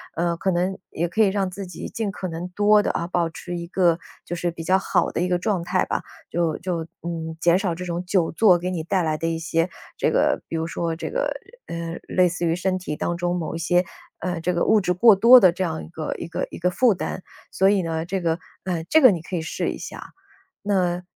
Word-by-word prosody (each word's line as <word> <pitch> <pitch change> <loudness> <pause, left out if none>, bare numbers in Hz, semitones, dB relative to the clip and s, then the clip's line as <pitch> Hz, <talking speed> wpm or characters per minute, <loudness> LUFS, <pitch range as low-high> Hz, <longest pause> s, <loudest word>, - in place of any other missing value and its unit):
呃， 170 0 0
可 190 - 0
能， 185 +2 0
也 170 +2 -1
可 220 - +1
以 215 - +6
让 195 -1 0
自 190 +1 -7
己 175 - -7
尽 220 -2 -3
可 185 -1 -5
能 165 +2 -5
多 210 0 +5
地 - - -1
啊， 170 - -2
保 170 -1 0
持 175 +2 -6
一 170 0 -6
个， 175 -2 +2 0.3
就 175 - -4
是 175 +1 -1
比 165 0 -8
较 185 +3 +3
好 - - +1
的 - - -3
一 180 - +1
个 180 0 +1
状 185 0 -1
态 185 +1 +1
吧。 - - -2 0.3
就 165 -2 0
就， 170 -2 -3 0.2
嗯， 165 -1 -4
减 175 +1 +4
少 185 -4 -1
这 180 - -6
种 175 -1 -3
久 180 -2 +1
坐 185 -1 +5
给 180 +2 -3
你 170 -3 -3
带 185 +2 0
来 155 -1 0
的 165 +2 -2
一 165 0 -1
些， 165 +1 0 0.3
这 - - +2
个 - - +2
比 - - -5
如 160 0 -1
说 165 0 -2
这 160 - -5
个， - - -1 0.3
嗯， 170 0 -5
类 180 -1 +3
似 175 0 -3
于 165 0 +2
身 185 +1 0
体 180 -5 -4
当 175 - -1
中 175 0 -1
某 165 - -3
一 - - -2
些， 175 +2 +2 0.4
嗯， 180 -2 -3
这 180 +2 0
个 170 - +1
物 215 -1 +4
质 180 - 0
过 215 +4 +7
多 235 +6 +9
的 185 -6 +6
这 185 - -2
样 160 -3 -3
一 - - -13
个 160 -1 -4
一 - - -6
个 170 - -3
一 - - -8
个 180 +1 +1
负 235 +5 +3
担。 180 0 -5 0.3
所 190 +1 +3
以 200 -1 +3
呢， 165 -1 -2
这 190 +2 -2
个， 165 0 0 0.3
嗯， 170 -3 -2
这 315 - +6
个 255 -5 +9
你 175 -4 -2
可 180 - -6
以 - - -2
试 160 - -2
一 - - -4
下， - - -9 0.5
那 180 -3 0
175 Hz, 275 characters per minute, -23 LUFS, 165-190 Hz, 0.5 s, 多